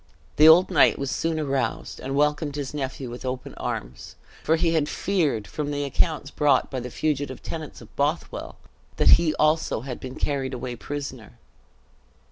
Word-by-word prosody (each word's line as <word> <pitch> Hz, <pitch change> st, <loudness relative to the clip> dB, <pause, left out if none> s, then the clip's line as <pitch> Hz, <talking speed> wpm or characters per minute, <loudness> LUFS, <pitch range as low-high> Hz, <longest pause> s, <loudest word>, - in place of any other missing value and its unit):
The 155 Hz, +2 st, +8 dB
old 170 Hz, +3 st, +7 dB
knight -, -, +5 dB
was 140 Hz, -1 st, -3 dB
soon 165 Hz, -1 st, -1 dB
aroused, 140 Hz, -3 st, -2 dB
and 135 Hz, +1 st, -4 dB
welcomed 150 Hz, 0 st, +1 dB
his 145 Hz, -2 st, -4 dB
nephew 135 Hz, -3 st, -4 dB
with 120 Hz, -, -8 dB
open 130 Hz, 0 st, -4 dB
arms; -, -, -6 dB, 0.3 s
for 160 Hz, -, +3 dB
he 165 Hz, 0 st, +1 dB
had 150 Hz, -2 st, +1 dB
feared, 155 Hz, -, 0 dB
from 150 Hz, +5 st, -4 dB
the 145 Hz, 0 st, -2 dB
accounts 145 Hz, +1 st, 0 dB
brought 150 Hz, -2 st, +2 dB
by 130 Hz, -, -2 dB
the 125 Hz, 0 st, -6 dB
fugitive 145 Hz, -1 st, -2 dB
tenants 160 Hz, -2 st, -7 dB
of -, -, -16 dB
Bothwell, 145 Hz, +4 st, -2 dB, 0.4 s
that -, -, +4 dB
he 160 Hz, -2 st, +1 dB
also 155 Hz, -6 st, +2 dB
had 125 Hz, -1 st, -6 dB
been 130 Hz, 0 st, -7 dB
carried 135 Hz, -2 st, -2 dB
away 125 Hz, 0 st, -5 dB
prisoner. 130 Hz, -, -7 dB
145 Hz, 170 wpm, -25 LUFS, 130-155 Hz, 0.4 s, The